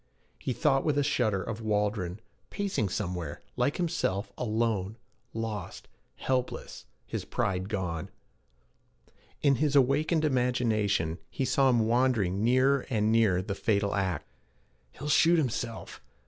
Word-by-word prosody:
He - - -3
thought 135 +1 +2
with 150 -2 +1
a 145 - +3
shudder 110 -9 +1
of 110 +3 -5
Waldron, 105 -3 -1 0.3
pacing 195 - -1
somewhere 90 -6 -4
like 145 - +1
himself, 160 - -1
alone, 110 -3 -1 0.3
lost, 110 -5 -5 0.3
helpless, 130 -1 -3 0.2
his - - -4
pride 95 -1 -2
gone. 90 -6 -3 1.3
In 140 -3 +4
his 145 +1 +1
awakened 150 +4 +3
imagination, 115 - +1
he 135 - -2
saw 135 +1 +3
him 120 -3 +3
wandering 115 -5 +2
nearer 130 +3 +3
and 110 -2 +1
nearer 110 -5 +3
the 100 - -3
fatal 100 0 0
act. 95 -3 -1 0.7
'He'll 145 - -7
shoot 165 +3 +5
himself. 120 -5 -3
115 Hz, 125 wpm, -29 LUFS, 100-135 Hz, 1.3 s, shoot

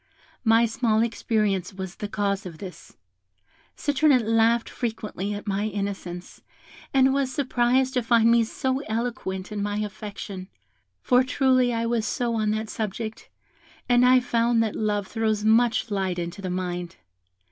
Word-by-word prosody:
My 225 0 +5
small 225 -1 +1
experience 210 -5 -1
was 190 -1 -6
the 210 - -4
cause 200 -2 -1
of 165 -3 -10
this. 185 +1 -11 0.8
Citronette 285 -4 +3
laughed 225 +1 +3
frequently 215 -4 -4
at 205 - -7
my 200 0 -1
innocence, 195 -4 -5 0.5
and 265 0 +4
was 275 -2 0
surprised 255 -1 +1
to 250 - +1
find 230 0 +4
me 235 0 +5
so 260 +4 -2
eloquent 220 -4 -3
in 210 -1 -3
my 205 0 -2
affection, 205 -2 -6 0.6
for 250 +1 +4
truly 255 -1 +2
I 230 0 -1
was 230 -2 0
so 240 +2 -1
on 215 -2 0
that 215 +1 -1
subject; 220 +1 -5 0.6
and 245 0 +4
I 255 0 +6
found 235 -1 +2
that 220 - -2
love 210 -2 0
throws 215 0 -1
much 230 +1 +3
light 190 -3 -1
into 175 +3 -5
the 185 - -4
mind. 180 -1 -3
220 Hz, 150 wpm, -25 LUFS, 200-240 Hz, 0.8 s, I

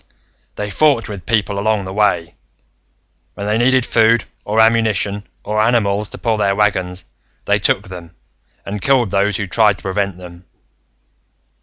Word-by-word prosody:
"They 105 0 -4
fought 140 -2 +2
with 100 -5 -8
people 105 -3 0
along 105 -1 0
the 95 - -6
way. 90 -5 +1 1.0
When 100 - -6
they 105 +2 0
needed 130 +1 +3
food, 115 -1 +3 0.2
or 105 +2 -1
ammunition, 110 -3 +2 0.2
or 105 +1 0
animals 105 -3 +1
to - - -10
pull 115 -2 -1
their 100 -2 +1
wagons, 95 -3 -1 0.4
they - - +2
took - - +1
them, 85 -3 -10 0.5
and 100 0 -5
killed 125 -6 +2
those 100 0 +1
who 100 - -3
tried 105 +1 +2
to - - -17
prevent 95 -1 -2
them. 90 0 -12
105 Hz, 155 wpm, -17 LUFS, 95-110 Hz, 1.0 s, needed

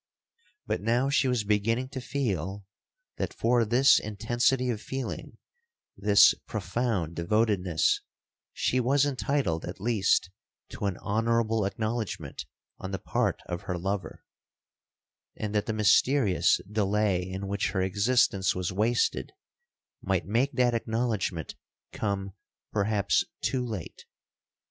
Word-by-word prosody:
But - - -2
now 120 +6 +1
she 140 - +3
was 125 -4 +1
beginning 115 +5 0
to 135 -2 -6
feel, 100 - -3 0.5
that - - -3
for 120 +1 +2
this 120 +5 +5
intensity 120 +4 0
of 110 -3 -4
feeling, 135 -1 -5 0.6
this 100 +1 +6
profound 100 -10 -2
devotedness, 95 -2 +1 0.5
she 130 - 0
was 135 +3 +3
entitled 135 - -1
at 90 +3 -7
least 100 -4 +1 0.4
to - - -5
an 95 -2 -1
honourable 115 0 0
acknowledgement 110 +2 -4 0.3
on 95 - -5
the 95 - -3
part - - -1
of 85 0 -4
her 90 - -1
lover; 95 +3 -4 1.1
and 105 -1 -4
that 105 -1 0
the - - 0
mysterious 105 - +3
delay 105 -2 +1
in 95 +2 -5
which 100 -1 -1
her 95 +1 0
existence 100 0 +2
was 90 0 -2
wasted, 115 - 0 0.7
might 95 -2 0
make 120 +8 +1
that 125 -1 +2
acknowledgement 110 -7 -2 0.4
come 100 -2 -3 0.4
perhaps 100 -1 +1 0.2
too 130 -2 0
late. 110 -9 -6
105 Hz, 120 wpm, -28 LUFS, 95-120 Hz, 1.1 s, this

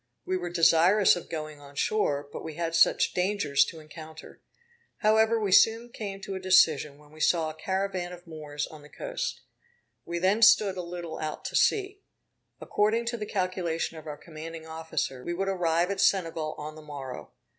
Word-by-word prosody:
We 185 - -1
were 175 -1 -3
desirous 175 +4 +5
of 175 - -8
going 155 -2 -6
on 140 0 -14
shore, 145 -6 0
but - - -6
we 160 -2 -7
had 165 0 -2
such 165 - +4
dangers 180 -7 +2
to 165 - -8
encounter. 155 +1 -12 0.6
However 220 +1 +4
we 205 -3 -1
soon 225 +4 +5
came 200 -4 -6
to 195 - -6
a 190 - -4
decision, 160 -6 +4
when 150 0 -20
we 155 - -15
saw 160 0 +2
a - - -11
caravan 190 +1 -2
of 175 0 -11
Moors 150 -3 -5
on 155 -1 -12
the 150 - -15
coast. - - -4 0.6
We 170 - -4
then 190 +5 +2
stood 205 -3 +6
a 185 - -3
little 170 -2 -6
out 155 -1 -5
to - - -4
sea. 400 -1 +2 0.6
According 220 +3 +1
to 235 - -3
the 210 -2 -5
calculation 180 -4 -2
of 155 -1 -10
our 150 -1 -6
commanding 160 0 -9
officer, 160 -5 -4
we 175 - -3
would 195 +2 -2
arrive 175 -1 +1
at 200 - -1
Senegal 165 -5 +1
on 150 +1 -6
the 155 - -12
morrow. 140 -4 -8
170 Hz, 190 wpm, -28 LUFS, 155-195 Hz, 0.6 s, stood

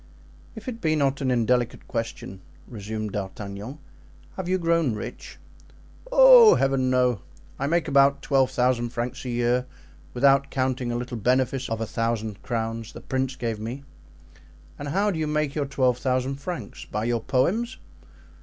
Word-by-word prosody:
"If 220 +2 -10
it 235 -2 -5
be 155 -2 +2
not 140 -1 0
an 135 - 0
indelicate 125 0 0
question," 115 -5 -5 0.3
resumed 110 -1 -5
D'Artagnan, 100 +5 -6 0.6
"have 185 -2 -4
you 185 - +2
grown 165 -8 +1
rich?" - - -8 0.7
"Oh, - - +9
Heaven! 135 -1 +1
no. 125 -5 +2 0.4
I 140 - -1
make 170 +2 +1
about 140 0 +4
twelve 135 -2 +2
thousand 125 -2 +1
francs 120 +2 -4
a - - -3
year, 120 +1 0 0.5
without 135 +1 +4
counting 130 -2 -1
a - - -2
little 120 0 -5
benefice 130 +3 0
of 115 0 -3
a - - 0
thousand 110 -2 -2
crowns 115 -2 -4
the - - -9
prince 130 0 -2
gave 115 -4 -3
me." 120 +6 -6 1.0
"And 145 - -5
how 200 +8 +1
do 165 - -3
you 155 - -1
make 150 -2 0
your 145 -2 -2
twelve 130 -3 +1
thousand 130 +1 -1
francs? 140 - -6
By 105 - -3
your 120 -1 0
poems?" 210 - 0
130 Hz, 160 wpm, -25 LUFS, 115-140 Hz, 1.0 s, Oh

